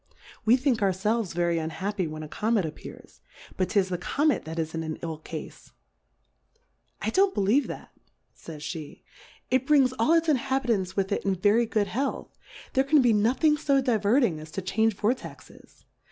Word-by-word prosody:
We 235 +3 +5
think 260 -4 0
our 195 -2 +2
felves 210 +2 -1
very 170 -1 +1
unhappy 185 +4 -3
when 155 0 -7
a - - -7
Comet 215 +3 0
appears, 155 - -10 0.3
but 185 - -1
'tis 195 -2 +1
the 180 -1 -3
Comet 290 - 0
that 160 +1 -6
is 160 -1 -2
in 165 - -3
an 160 -1 -4
ill 160 -2 -4
Cafe. 155 -1 -9 1.3
I 220 - 0
don't 385 - +3
believe 210 +9 +2
that, - - -8 0.4
fays 155 -3 -10
Jhe^ 155 -4 -7 0.5
it 260 +1 +1
brings 275 -4 +4
all 230 +9 +3
its 330 0 +3
Inhabi 270 -2 +1
tants 185 -3 -3
with 195 0 -1
it - - -1
in 195 -1 +1
very 210 +5 +3
good 215 -2 +1
Health; 260 +8 -3 0.4
there 265 - +3
can 280 0 +4
be 240 -2 +4
nothing 250 +9 +3
fo 280 -2 +2
diverting 225 - +2
as 155 +1 -10
to 195 - -3
change 215 +3 +1
Vortexes. 240 +6 -5
210 Hz, 180 wpm, -26 LUFS, 180-260 Hz, 1.3 s, We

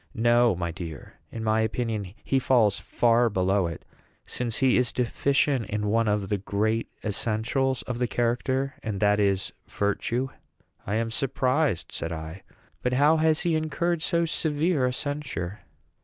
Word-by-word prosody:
"No, 120 -2 +4
my 85 -1 -3
dear; 80 -4 -9
in 115 - -5
my 110 0 +2
opinion 110 -3 -2
he 135 - +1
falls 115 -6 +3
far 120 0 +2
below 95 -1 +1
it, 85 - -7 0.4
since 120 -2 -1
he 130 -2 +4
is 125 -1 +2
deficient 135 +1 +1
in 105 0 -2
one 115 +1 +2
of 105 -2 0
the 105 - 0
great 110 +4 -1
essentials 115 +5 0
of 125 -1 -4
the 125 - +1
character; 130 +4 0
and 105 -3 -3
that 105 0 +3
is 100 -2 +1
virtue." 115 +5 -1 0.6
"I 100 - 0
am 115 0 -1
surprised," 130 - 0
said 85 - -4
I; 80 +3 -6 0.4
"but 125 - 0
how 145 +5 +4
has 160 0 +3
he 170 -2 +1
incurred 155 +2 -1
so 170 0 +1
severe 155 -3 +1
a - - 0
censure?" 130 - -3
115 Hz, 155 wpm, -26 LUFS, 105-135 Hz, 0.6 s, No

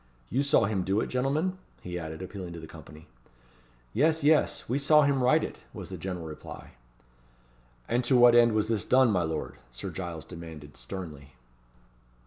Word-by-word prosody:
You 130 - +2
saw 140 -5 +3
him 100 -2 0
do 95 +3 +1
it, - - -2
gentlemen?" 150 +9 0 0.2
he 90 0 -4
added, 80 +1 -6
appealing 95 -2 -7
to 85 - -7
the 80 - -9
company. 75 0 -13 0.9
"Yes 155 +5 +2
yes! 155 +1 +3
we 130 +5 0
saw 150 +2 +5
him 140 -2 +2
write 125 +1 +4
it!" - - -6 0.2
was - - -7
the - - -6
general 90 -3 -5
reply. 75 -1 -9 1.2
"And 120 +1 +1
to 125 +1 +4
what 120 -1 +7
end 120 -1 +6
was 110 0 +1
this 110 -4 0
done, 130 -2 +4
my 90 -3 +2
lord?" 80 -2 -3
Sir - - -6
Giles 85 -4 -6
demanded, 80 -4 -10
sternly. 70 +1 -8
100 Hz, 175 wpm, -28 LUFS, 80-130 Hz, 1.2 s, what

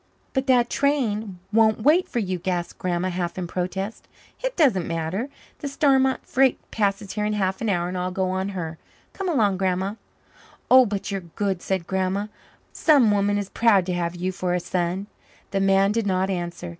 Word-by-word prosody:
"But 265 +1 -1
that 245 -2 +4
train 225 -9 0 0.2
won't 220 -1 +3
wait 345 +7 +4
for - - -4
you," 185 -5 -1
gasped 175 -1 -3
Grandma, 180 0 -1
half 175 -1 -3
in 185 - -2
protest. 185 +4 -4 0.4
"It - - -1
doesn't 240 - +3
matter. 165 - -2 0.3
The 285 - -4
Starmont 270 -2 +2
freight 270 -1 +3
passes 200 -2 -1
here 210 - -2
in 210 0 0
half 190 -2 -1
an 225 - 0
hour 175 -3 0
and 180 - -4
I'll 180 0 -1
go 185 0 -1
on 190 +1 -1
her. 160 -2 -5 0.3
Come 390 -2 -3
along, 210 - +2
Grandma." 190 +1 0 0.8
"Oh, 255 -1 +8
but 200 0 -3
you're 195 -1 -2
good," 195 -3 -1
said 190 -3 -2
Grandma. 190 +2 -1 0.5
"Some 275 -9 +4
woman 205 0 +2
is 200 -1 -3
proud 210 -6 +3
to 180 - -2
have 175 0 -2
you 180 +2 -2
for 180 -1 -1
a - - +1
son." 175 +2 -2 0.5
The 195 - 0
man 195 +1 +4
did 225 -1 0
not 190 0 +1
answer. 175 -1 -4
195 Hz, 190 wpm, -24 LUFS, 180-225 Hz, 0.8 s, Oh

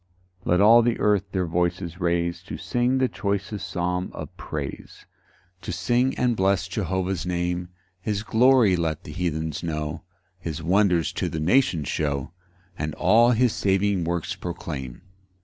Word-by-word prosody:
1 - - +2
Let 90 - +3
all 115 +3 +8
the 120 0 0
earth 105 -2 +2
their 95 -2 0
voices 85 +1 -1
raise 85 0 0
To - - -6
sing 125 +1 0
the 130 0 +3
choicest 100 -1 -3
psalm 90 +1 -1
of - - -8
praise, - - -7 0.6
To - - -5
sing 120 +8 +1
and 125 -2 +2
bless 95 -2 +1
Jehovah's 95 -1 -2
name: 90 0 -2 0.3
His 105 +1 -2
glory 115 -3 +4
let 80 -3 -2
the - - -9
heathens 80 -1 -2
know, 75 -1 -3 0.4
His 80 -2 -5
wonders 90 -1 +2
to - - -2
the 80 - -4
nations 85 - +2
show, 70 -1 -2 0.5
And 75 -1 -3
all 115 +2 +5
his 120 0 +2
saving 95 -1 +1
works 85 0 -2
proclaim. 75 -7 -6
90 Hz, 150 wpm, -25 LUFS, 85-105 Hz, 0.6 s, all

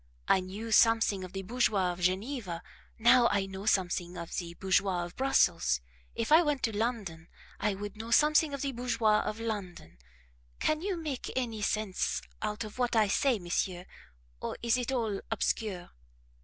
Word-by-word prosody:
I - - +5
knew 200 +5 -6
something 225 -3 +4
of 185 - -8
the 195 0 -5
bourgeois 205 -4 +1
of 175 - -11
Geneva, 185 -1 -1 0.3
now 240 +1 +6
I 200 -2 +1
know 195 +2 -7
something 180 -3 0
of 170 - -6
the 170 -1 -4
bourgeois 190 -1 +1
of 175 - -11
Brussels; 255 - +2 0.4
if 230 +4 -2
I 320 +2 +8
went 295 -5 -1
to 225 -3 0
London, 205 -8 -3 0.3
I 210 -1 0
would 205 +1 -6
know 225 +2 -7
something 300 +4 +4
of 280 -1 -4
the 275 - -1
bourgeois 230 -3 +1
of 215 +1 -4
London. 185 - -5 0.6
Can 310 0 +1
you 385 -1 -2
make 300 -6 -4
any 235 -4 -2
sense 210 -2 -1 0.2
out 210 +1 -2
of 215 +3 -9
what 245 -1 +1
I 215 -2 +4
say, 255 +4 +2
monsieur, 180 0 -2 0.6
or - - -4
is 235 0 +3
it 250 0 -2
all 225 -6 -1
obscure?" 205 -4 -2
215 Hz, 170 wpm, -30 LUFS, 185-245 Hz, 0.6 s, I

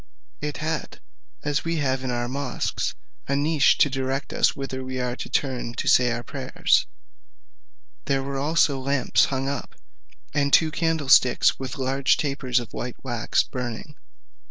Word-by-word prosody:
It 150 0 -3
had, 155 +1 -4 0.4
as 145 0 0
we 165 0 -1
have 135 -4 0
in 130 - -2
our 120 0 -1
mosques, 135 0 -2 0.3
a 140 - 0
niche, 145 0 +3
to - - +5
direct 135 +1 -3
us - - +2
whither 130 -1 -5
we 130 0 -4
are 125 -1 -2
to - - -6
turn 125 -4 -2
to - - -3
say 125 -1 +5
our 120 0 -2
prayers: 130 -1 +1 1.2
there 135 -1 0
were 135 0 -3
also 145 -1 +2
lamps 135 0 +2
hung 135 0 -2
up, 140 -2 -4 0.6
and 140 -1 +1
two 160 +1 +5
candlesticks 150 -6 +3
with 130 0 -5
large 135 +1 +2
tapers 135 -4 0
of 120 - -9
white 125 0 -5
wax 120 -4 0
burning. 125 +4 -6
135 Hz, 155 wpm, -24 LUFS, 130-145 Hz, 1.2 s, to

